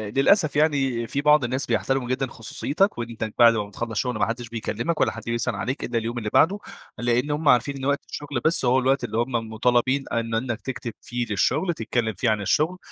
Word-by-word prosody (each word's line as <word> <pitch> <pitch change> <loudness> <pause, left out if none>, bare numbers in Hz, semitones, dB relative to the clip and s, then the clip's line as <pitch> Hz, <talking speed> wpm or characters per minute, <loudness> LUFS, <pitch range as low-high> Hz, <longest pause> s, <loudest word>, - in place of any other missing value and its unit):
للأسف 155 +2 +3
يعني 135 -6 +1
في 140 - -2
بعض 150 -1 +5
الناس 130 +3 -1
بيحترموا 135 -2 0
جدًا 130 +1 0
خصوصيتك 145 - -1
وأنت 115 -2 -4
بعد 115 -1 +8
ما 105 -2 -1
بتخلص 115 +3 -5
الشغل 125 +3 -1
ما - - +3
حدش 120 0 -4
بيكلمك 120 +7 -2
ولا - - +3
حد - - -8
بيسأل 115 0 -1
عليك 130 +4 -3
إلا 120 -1 -2
اليوم 115 +2 -3
اللي 110 -3 -3
بعده، 195 +5 +4 0.4
لأن 120 +4 0
هم 150 0 +1
عارفين 135 +3 +3
إن 135 - -5
وقت 140 0 0
الشغل 145 -4 -4
بس 160 -4 +2
هو 125 +2 +4
الوقت 130 +1 +1
اللي 115 -2 -3
هم 120 +3 0 0.2
مطالبين 125 +4 +1
إن 115 -1 -1
إنك 115 -1 -2
تكتب 120 -3 -5
فيه 120 0 -3
للشغل، 140 - +1
تتكلم 115 -3 -2
فيه 105 +5 0
عن 110 -1 +1
الشغل، 155 - +1
125 Hz, 210 wpm, -24 LUFS, 115-140 Hz, 0.4 s, بعد